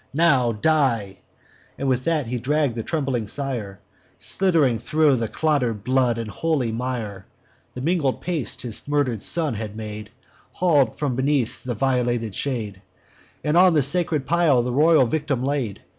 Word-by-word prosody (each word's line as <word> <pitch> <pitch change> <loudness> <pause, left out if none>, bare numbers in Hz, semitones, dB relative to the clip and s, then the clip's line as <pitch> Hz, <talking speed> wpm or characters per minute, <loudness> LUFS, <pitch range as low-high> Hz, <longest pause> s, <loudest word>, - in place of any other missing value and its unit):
Now 140 -7 +3
die!' 115 -6 0 0.6
With 130 -2 -1
that 160 -4 +1
he 125 +2 -3
dragg'd 145 0 0
the 115 - -2
trembling 135 -5 -2
sire, 115 -7 -4 0.4
Slidd'ring 160 -11 +2
thro' 150 +4 +2
clotter'd 125 -8 -1
blood 125 -1 +1
and 115 -1 -4
holy 150 -8 -1
mire, 115 -5 -4 0.5
(The 125 - -5
mingled 155 -3 0
paste 170 -7 -2
his 120 0 -5
murder'd 140 -7 0
son 160 -5 +1
had 105 -1 -6
made,) 105 -1 -7 0.4
Haul'd 145 -10 +2
from 140 -4 -1
beneath 130 -2 -1
the 125 -2 -3
violated 120 -3 0
shade, 110 -7 -3 0.6
And 150 +1 0
on 180 -1 +6
the 150 - +4
sacred 155 -1 +2
pile 160 -7 +3
the 125 0 -3
royal 155 0 +5
victim 145 -1 -2
laid. 135 -7 -2
130 Hz, 145 wpm, -23 LUFS, 115-150 Hz, 0.6 s, on